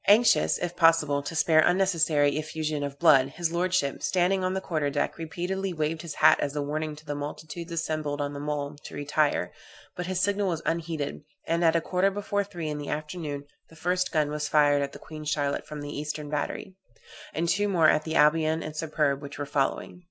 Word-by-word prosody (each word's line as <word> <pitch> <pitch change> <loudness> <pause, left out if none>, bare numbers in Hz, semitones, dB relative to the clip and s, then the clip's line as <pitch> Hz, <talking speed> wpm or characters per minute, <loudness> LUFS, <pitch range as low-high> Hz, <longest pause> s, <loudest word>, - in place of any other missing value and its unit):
Anxious, 220 +3 +5
if 175 0 -4
possible, 160 -4 +4
to 155 +3 -6
spare 160 0 +4
unnecessary 165 -5 +3
effusion 155 -1 -3
of 140 -1 -4
blood, 140 -6 +6
his 165 +3 -2
lordship, 175 -4 0
standing 185 +1 +1
on 185 +1 0
the - - 0
quarter 155 -6 -1
deck, 145 +3 -2
repeatedly 180 +4 -3
waved 160 0 -2
his 160 -4 -7
hat - - +6
as 145 0 -2
a 145 - 0
warning 155 +1 -3
to 155 +1 -15
the 145 - -3
multitudes 155 +4 -6
assembled 155 -3 -2
on 145 0 -2
the 140 - -6
mole 145 0 -3
to - - -9
retire, 145 +1 0 0.4
but 180 0 -4
his 185 -1 -1
signal 200 +1 +1
was 170 -3 -2
unheeded, 165 -4 -2 0.2
and 170 +1 0
at 165 0 +4
a 165 - +3
quarter 185 +3 +1
before 205 0 -1
three 175 -5 -6
in 150 -1 -3
the 145 - -6
afternoon 150 -1 -4 0.3
the 165 - -16
first 180 +3 0
gun 150 -3 +1
was 150 0 -2
fired 145 -1 +4
at 140 0 -2
the - - -10
Queen 155 -1 -9
Charlotte 145 -1 -1
from 150 -1 -7
the 145 0 -6
eastern 150 0 -4
battery, 150 +5 -3 0.6
and 165 +3 -1
two 205 +5 +2
more 170 -5 +4
at 155 - +3
the 160 0 -4
Albion 160 +1 +3
and 155 0 -6
Superb, 150 -3 0
which 140 -1 -8
were 145 - -3
following. 140 +4 -1
155 Hz, 210 wpm, -27 LUFS, 145-175 Hz, 0.6 s, blood